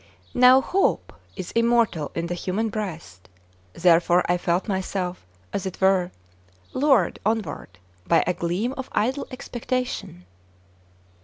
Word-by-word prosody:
Now 255 +1 +7
hope 385 +7 0 0.2
is 185 -3 -6
immortal 230 -9 +2
in 170 - -2
the 175 - -3
human 190 +5 -2
breast; 165 - -6 0.4
therefore 175 +1 +4
I 175 - +3
felt 175 +2 -1
myself, 185 - -3 0.3
as 195 - -2
it 185 - -7
were, 190 -2 +3 0.6
lured 265 - +2
onward 215 - -3 0.3
by - - +4
a 180 - +1
gleam 180 +9 -2
of 265 - -6
idle 260 +6 0
expectation. 250 - -4
190 Hz, 125 wpm, -24 LUFS, 175-235 Hz, 0.6 s, Now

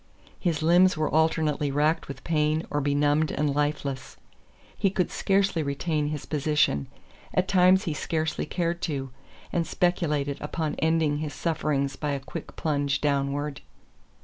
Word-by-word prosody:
His 165 -4 -1
limbs 175 +2 +5
were 155 - -1
alternately 155 -2 +2
racked 150 +3 +1
with 140 - -8
pain 155 -1 +1
or 145 - 0
benumbed 145 +2 +2
and 145 -1 0
lifeless. 145 -2 -2 0.6
He 195 - +2
could 185 -1 -1
scarcely 195 -3 +1
retain 150 +1 -1
his 150 -1 -4
position 145 - +1 0.5
at 185 0 +2
times 190 0 +5
he 165 -7 -2
scarcely 160 +1 -2
cared 170 -1 -1
to 135 -5 -3 0.4
and 170 -1 0
speculated 150 -6 0
upon 155 +1 -2
ending 160 -2 +2
his 150 -2 -4
sufferings 145 -3 -1
by 150 -2 -2
a 140 - -2
quick 135 - -8
plunge 145 -3 0
downward. 140 0 -1
150 Hz, 145 wpm, -26 LUFS, 145-165 Hz, 0.6 s, limbs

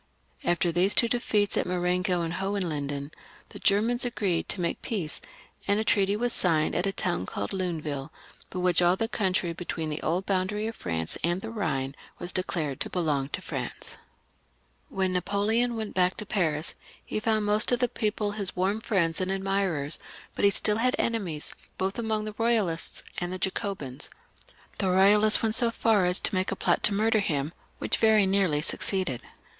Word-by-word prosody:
After 175 0 +2
these 180 +4 +2
two 235 - +6
defeats 215 -4 0
of - - 0
Marengo 180 0 0
and 165 0 -2
Hohenlinden, 155 -7 -2 0.4
the - - -10
Germans 225 +5 +2
agreed 200 -8 -1
to - - -1
make 170 -1 -2
peace, 185 -9 -3 0.5
and 200 +1 +3
a - - +1
treaty 200 -2 +2
was 240 +2 -1
signed 160 -7 +2
at 190 - 0
a - - +1
town 180 - -2
called 100 - -4
Luneville, 155 -7 -3 0.4
by - - -7
which 180 0 +3
all 175 +1 +4
the 225 +4 -1
country 185 -6 0
between 165 -2 -4
the 150 - -4
old 175 +4 -1
boundary 200 +2 0
of 225 0 -4
France 80 -2 -3
and 175 +3 0
the 225 - -6
Ehine 135 -12 -2 0.2
was 175 - -3
declared 165 -7 -2
to - - -3
belong 150 -6 0
to - - -4
France. - - -6 0.9
When 190 -1 0
NaJ)oleon 205 +6 +1
went 220 -2 -4
back 180 0 +3
to 215 - -4
Paris 160 -7 0 0.3
he - - -2
found 215 -1 +1
most 210 +2 +2
of 245 - +4
the 245 - +1
people 210 -2 -1
his 205 -2 -1
warm 195 +4 0
friends 170 -6 +1
and 185 - -1
admirers; 195 -6 0 0.3
but - - -3
he 200 - +7
stiU 210 +1 +3
had 250 +3 +2
enemies, 190 -10 -1 0.2
both 190 +4 -2
among 220 -2 -1
the 215 - -5
Boyalists 215 -7 0 0.2
and 175 0 -2
the 185 - -3
Jacobins. 185 - -2 0.7
The 195 - +1
Eoyalists 205 +4 +5
went 220 -1 +1
so 235 0 +7
far 220 -4 +2
as 180 +1 +2
to - - 0
make 185 0 0
a - - -1
plot - - +1
to 205 - +4
murder 220 +2 +3
him, 150 -5 -1 0.2
which - - 0
very 220 -2 +5
nearly 190 -6 +2
succeeded. 185 - -1
190 Hz, 180 wpm, -27 LUFS, 170-215 Hz, 0.9 s, he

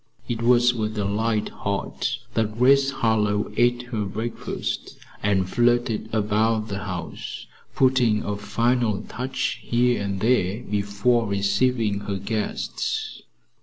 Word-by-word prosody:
It 115 -1 -2
was 120 +1 +5
with 110 -2 -3
a 105 - 0
light 105 +2 0
heart 100 +4 -2 0.2
that 110 -1 -1
Grace 135 +2 +5
Harlowe 105 -5 +1
ate 120 +1 +2
her 110 -3 -1
breakfast 110 +4 -4 0.2
and 95 -3 +1
flitted 120 0 +1
about 110 +1 +1
the 100 -1 -3
house, 85 -5 -6 0.3
putting 125 -5 +3
a 105 - -2
final 115 0 0
touch 130 +2 -3
here 120 0 +1
and 100 -1 -2
there 110 -1 +1
before 105 +3 +1
receiving 100 +2 +1
her 100 -1 -3
guests. 105 +2 -3
110 Hz, 125 wpm, -24 LUFS, 100-120 Hz, 0.3 s, was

